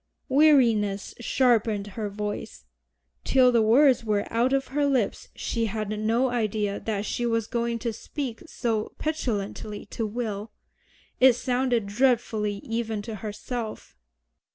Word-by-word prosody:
Weariness 235 -9 +4
sharpened 230 -4 +2
her 215 -1 -3
voice. 205 - -5 0.6
Till 255 -2 +5
the 235 -2 +4
words 250 +3 +5
were 210 -2 0
out 235 +3 +2
of 270 0 0
her 285 +2 +1
lips 255 -7 0
she 230 -1 -1
had 215 0 -3
no 225 +4 +1
idea 215 -3 -1
that 210 -2 -3
she 240 - -2
was 230 -2 +1
going 235 0 -1
to 230 -1 -3
speak 250 +1 -5
so 225 -7 -2
petulantly 215 -8 -3
to 225 - -2
Will. 215 -1 -4 0.7
It 260 0 +7
sounded 245 -2 0
dreadfully 220 -2 +1
even 225 -2 -3
to 225 -1 -6
herself. 220 - -6
230 Hz, 130 wpm, -26 LUFS, 210-250 Hz, 0.7 s, It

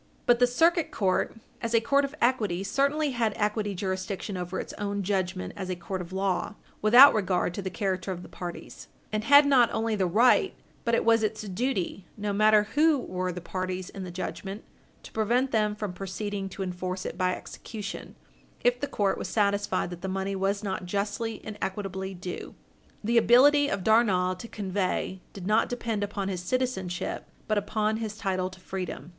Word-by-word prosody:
But 240 -1 +4
the 245 - +5
Circuit 330 +6 +3
Court 190 +1 0 0.3
as 230 0 -1
a - - +7
court 280 +5 +2
of 275 - -7
equity 210 -7 +1
certainly 280 +8 +1
had 230 -4 0
equity 210 -1 -1
jurisdiction 190 +1 -3
over 180 0 -3
its - - -6
own 200 -1 -2
judgment 185 -1 -2
as 190 -2 -5
a 185 - -1
court 180 +2 -5
of 175 0 -9
law, 195 +1 -1 0.3
without 245 +7 +9
regard 185 -4 0
to 200 - -4
the 190 - -3
character 190 -1 -2
of 180 -1 -5
the - - -10
parties, 175 -1 -8 0.2
and 215 0 -1
had 285 +1 +8
not 260 -5 +5
only 220 0 0
the 190 -3 +1
right, 230 +8 +4 0.3
but 235 -1 +3
it - - 0
was 230 0 +5
its 215 0 -1
duty 195 -2 -2
no 205 -1 -2
matter 215 +1 +5
who 310 0 +4
were 185 -6 -3
the 180 0 -6
parties 185 +1 -4
in 195 - -7
the 185 - -6
judgment 190 +3 -5 0.4
to - - -11
prevent 240 +5 +1
them 210 -2 +1
from 210 -3 -4
proceeding 195 +1 -4
to 190 +1 -5
enforce 185 0 -4
it - - -4
by 185 0 +1
execution 210 -2 -8 0.5
if 245 0 +3
the 285 - -2
court 200 -6 0
was - - -4
satisfied 200 -3 0
that 175 -1 -8
the 190 - -3
money 195 +1 -2
was 195 +2 0
not 190 -2 -3
justly 205 +4 -2
and 210 -1 -7
equitably 190 -1 -3
due. 180 0 -7 0.5
The 230 +2 +4
ability 285 +5 +6
of 195 -2 -2
Darnall 190 -5 +3
to 230 - -7
convey 190 -2 -2
did 190 -3 -9
not 215 +3 +3
depend 230 -4 -2
upon 200 -1 -3
his 185 -2 -3
citizenship, 190 -5 -2 0.2
but 215 -1 +2
upon 215 +1 -1
his 215 -2 -4
title 185 -2 -1
to 185 0 -14
freedom. 185 -5 -5
200 Hz, 190 wpm, -27 LUFS, 185-225 Hz, 0.5 s, without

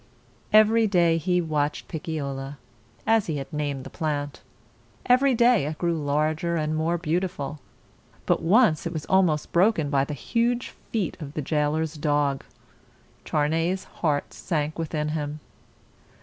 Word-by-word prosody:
Every 215 +1 +5
day 170 -4 +3
he 180 +2 +1
watched 150 -3 -1
Pic 160 - -6
cio 150 -4 -2
la, 135 +1 -6 0.5
as 225 -2 +3
he 155 -3 -2
had 140 +3 -7
named 145 -3 -2
the 135 - -10
plant. 145 -3 -3 0.6
Every 255 +1 +4
day 235 - +4
it 155 +1 -4
grew 170 +1 0
larger 155 +3 0
and 155 -1 -1
more 165 +2 0
beautiful. 170 -3 -2 0.7
But - - +2
once 175 -2 +3
it 170 - -5
was 155 -2 -4
almost 180 -6 +2
broken 170 -5 +2
by 135 -1 +2
the 150 - -5
huge 235 - 0 0.2
feet 210 -8 -2
of 145 -1 -8
the 155 - -1
jailer's 155 +2 0
dog. 145 -3 0 0.8
Charney's 165 +5 0
heart 150 -4 -2
sank 155 -2 -2
within 150 -2 -2
him. 150 -1 -3
155 Hz, 150 wpm, -25 LUFS, 150-180 Hz, 0.8 s, Every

